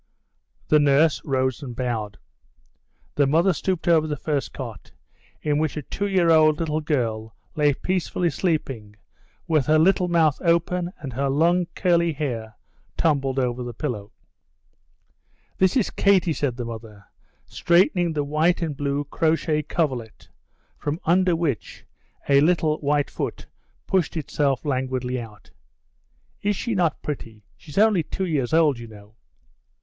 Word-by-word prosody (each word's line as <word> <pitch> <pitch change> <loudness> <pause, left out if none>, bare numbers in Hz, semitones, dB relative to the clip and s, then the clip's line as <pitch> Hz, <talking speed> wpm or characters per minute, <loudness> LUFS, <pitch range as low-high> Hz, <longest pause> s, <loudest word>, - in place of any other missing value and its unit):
The 155 - +5
nurse 145 +2 +3
rose 130 -1 -1
and 125 -4 -7
bowed. 115 -4 -3 1.0
The 145 -1 +2
mother 170 +6 +3
stooped 180 +1 -2
over 160 -2 +4
the 150 -1 -3
first 145 -1 -2
cot, 115 -6 -9 0.5
in 150 -1 +1
which 155 -1 -1
a 150 - -4
two 200 +9 -3
year 180 -4 +3
old 155 -1 +5
little 155 -2 -1
girl 115 -7 -2 0.2
lay 145 -2 +3
peacefully 180 -1 -1
sleeping 135 - -2 0.5
with 155 -5 +1
her 155 +1 +5
little 180 +3 +3
mouth 165 -4 +2
open 170 +1 +1
and 135 -4 -7
her 135 +3 -1
long, 170 +5 +2
curly 170 -3 +2
hair 115 -7 -4 0.4
tumbled 140 -4 +1
over 125 -1 -1
the 120 -1 -6
pillow. 110 -9 -4 1.5
"This 190 +6 +3
is 235 - +1
Katie," 190 -4 +3
said 135 -5 -2
the 120 - -4
mother, 110 -3 -9 0.4
straightening 175 -1 +2
the 150 -1 -1
white 155 +5 +1
and 155 -3 -3
blue 140 +1 -1
crochet 155 +1 0
coverlet, 135 -7 -3 0.5
from 150 +3 -3
under 180 +1 +3
which 160 -9 -3 0.4
a 140 0 +5
little 155 -1 +2
white 145 0 0
foot - - -4 0.4
pushed 180 -3 0
itself 140 -3 -1
languidly 130 -2 -2
out. 105 -3 -13 0.9
"Is 205 0 0
she 235 +4 -3
not 175 -6 0
pretty? 115 -7 -6
She's 150 +1 -13
only 210 -3 +4
two 190 +4 -4
years 145 -8 -1
old, 155 -6 +3
you 115 - -8
know." 105 -1 -15
150 Hz, 145 wpm, -23 LUFS, 130-170 Hz, 1.5 s, The